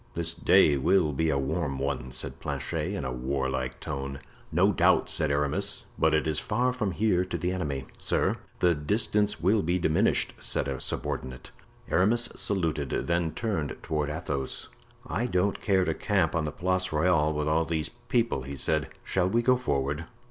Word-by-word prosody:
"This 85 0 0
day 85 -3 +4
will 80 +2 +3
be 80 +4 +1
a 70 - +2
warm 70 +1 -1
one," 65 -2 -3
said 65 - -6
Planchet, - - -3
in 70 - -3
a 65 - -2
warlike 65 0 -2
tone. 70 0 -4 0.3
"No - - +4
doubt," - - +3
said 75 - +2
Aramis, 70 0 0
"but 80 -1 +3
it 75 - +1
is 80 -1 0
far 125 +4 0
from 105 -7 -2
here 95 -2 +2
to - - -3
the 90 0 -1
enemy." 75 -8 -3
"Sir, - - 0 0.2
the 90 -1 +5
distance 105 +6 0
will 100 +5 +3
be 85 +2 +1
diminished," 80 -3 +2
said - - -1
a 65 -2 -3
subordinate. 65 0 -3 0.4
Aramis 115 +6 +3
saluted, 80 -8 0 0.2
then 85 -1 0
turning 95 - -2
toward 75 -2 -1
Athos: 75 -4 -3 0.4
"I 125 -1 -1
don't 95 -1 0
care 95 -2 +2
to 80 - 0
camp 95 -2 +1
on 80 -2 0
the 75 - -2
Place 95 +2 0
Royale 80 -1 +3
with 75 0 -1
all 80 +2 +2
these 80 -3 -1
people," 120 - -1
he 70 +2 -6
said. 75 +3 +1 0.2
"Shall 95 -1 +1
we 120 +4 +1
go 130 +1 +5
forward? 75 - -1
80 Hz, 175 wpm, -28 LUFS, 70-95 Hz, 0.4 s, the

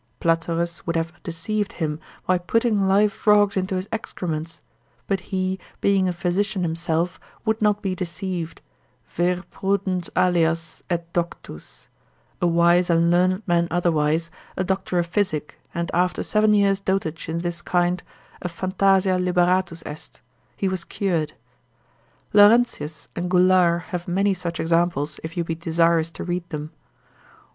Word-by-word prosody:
Platerus 165 +1 0
would 165 - -1
have 165 +1 -3
deceived 200 +4 -3
him, 155 -2 -2 0.3
by 185 -1 +2
putting 210 +1 +1
live 200 +2 +4
frog's 205 -1 +3
into 190 0 -1
his 185 +1 -3
excrements; 165 -7 -4 0.4
but 195 - 0
he, 190 -1 -1 0.2
being 195 -2 +3
a - - +1
physician 185 +2 -1
himself, 165 +1 -1 0.3
would 220 0 0
not 210 -1 +2
be 190 -2 0
deceived, 180 -2 -4 0.5
vir 180 +1 0
prudens 190 -2 -1
alias, 165 -2 +1
et 170 -1 -3
doctus 170 - -5 0.5
a 175 - +3
wise 170 +1 +4
and 170 0 +3
learned 185 +3 +2
man 170 -2 +2
otherwise, 165 -1 +1 0.3
a 185 - +1
doctor 190 -1 -1
of 175 - +2
physic, 170 -5 -2
and 170 0 -3
after 180 +1 +1
seven 215 0 +3
years' 200 -1 +3
dotage 190 -6 -2
in 165 +1 -2
this 175 -1 -3
kind, 175 0 +1 0.4
a 180 - -3
phantasia 185 +1 +2
liberatus 180 -1 +1
est, 150 - -9 0.4
he 195 - 0
was 185 -2 -2
cured. 170 -7 -1 1.0
Laurentius 205 -9 +4
and 175 +1 -2
Goulart 180 -2 +4
have 175 -1 -4
many 195 +3 +2
such 170 -2 -4
examples, 165 -3 +1
if 165 +3 -7
you 170 - +1
be 165 - -3
desirous 165 0 +2
to - - -7
read 175 -1 -3
them. 150 -1 -5
175 Hz, 145 wpm, -23 LUFS, 165-190 Hz, 1.0 s, live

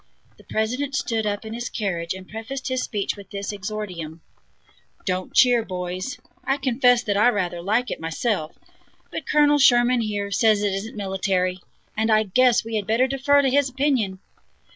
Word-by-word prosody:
The - - -16
President 250 +6 -2
stood 225 -3 -1
up 205 +1 -3
in 220 - -6
his 240 +1 -4
carriage 175 -5 -2
and 185 0 -10
prefaced 245 +5 -6
his 255 0 -1
speech 205 -3 -2
with 200 -2 -13
this 200 0 -4
exordium: 185 -6 -6 0.8
"Don't 185 -1 -2
cheer, 245 -2 +5
boys; 185 +6 -4 0.3
I 270 +1 0
confess 245 -2 +3
that 205 -3 -1
I 215 +4 +5
rather 180 -6 -2
like 220 +7 0
it, - - -4
myself; 165 +1 -2 0.5
but - - -6
Colonel 295 -1 +4
Sherman, 245 -2 +5
here, 205 -2 -3
says 215 0 +3
it 200 -2 +1
isn't 215 +4 -5
military, 190 -2 -1 0.4
and 220 +1 0
I 215 0 +4
guess 240 +3 +3
we 225 -1 -2
had 205 - -3
better 230 +4 +3
defer 275 +2 +3
to 270 - +3
his 280 0 +3
opinion." 255 -8 0
220 Hz, 175 wpm, -23 LUFS, 195-250 Hz, 0.8 s, cheer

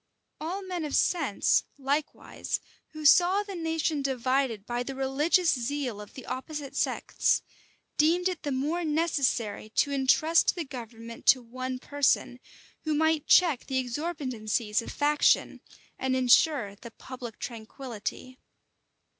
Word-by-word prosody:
All 360 +6 -4
men 365 -3 -4
of 295 -2 -2
sense, 295 - +2
likewise, 285 +2 -2 0.3
who 310 -1 -7
saw 365 +6 +6
the 405 -1 -8
nation 325 -3 -1
divided 260 -4 0
by 240 +1 -2
the 270 +2 -5
religious 295 +6 +2
zeal 250 -3 -3
of 210 - -13
the 260 - -9
opposite 275 +2 -6
sects, - - +1 0.5
deemed 340 +4 +3
it 365 -3 -3
the 290 - -3
more 300 +7 -1
necessary 290 -10 0
to 285 - +2
intrust 295 +6 +3
the 340 -3 -3
government 230 -3 -9
to 255 -2 +6
one 255 +2 -5
person, 275 -2 0 0.4
who 310 -1 0
might 315 0 +1
check 330 -9 +4
the 265 - -1
exorbitancies 250 -6 -2
of - - -7
faction, 295 0 +2 0.4
and 260 0 0
insure 255 -3 +3
the 235 +3 -11
public 240 -1 -9
tranquillity. 240 +1 -7
275 Hz, 130 wpm, -28 LUFS, 245-315 Hz, 0.5 s, saw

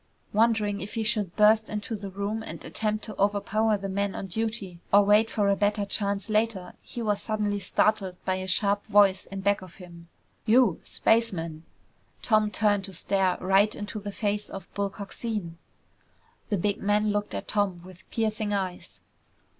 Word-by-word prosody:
Wondering 215 -2 +2
if 200 - -7
he 225 - 0
should 210 -5 -1
burst 215 +1 +5
into 210 +2 -4
the 200 -1 -6
room 200 +3 -3
and - - -8
attempt 215 -1 -2
to 215 - -8
overpower 210 +2 +2
the 195 0 -5
men 200 0 -1
on - - -4
duty, 200 -2 -3
or 200 0 +6
wait 210 +2 +5
for 205 -2 +1
a 200 - +4
better 205 0 +1
chance 200 0 -1
later, 215 -4 0
he 240 - -6
was 210 -2 0
suddenly 210 -2 -1
startled 200 -2 +1
by 185 0 +1
a 185 0 -5
sharp 200 +2 +1
voice 200 -3 +4
in 195 0 -6
back 200 0 +2
of 185 -2 -12
him. 170 -2 -13 0.4
"You 230 -5 +4
spaceman!" 170 -8 0 0.6
Tom 215 -2 +3
turned 205 -2 +1
to 195 - -9
stare 190 0 +1
right 195 +3 +3
into 205 +1 -5
the 205 0 -6
face 205 0 -2
of 195 -2 -9
Bull 200 0 -1
Coxine! 200 -4 -5 0.9
The 205 - +1
big 200 +3 0
man 210 +1 +2
looked 205 0 -2
at - - -5
Tom 195 -4 -1
with 185 -1 -15
piercing 215 -2 -1
eyes. 185 -3 -4
205 Hz, 175 wpm, -27 LUFS, 195-215 Hz, 0.9 s, or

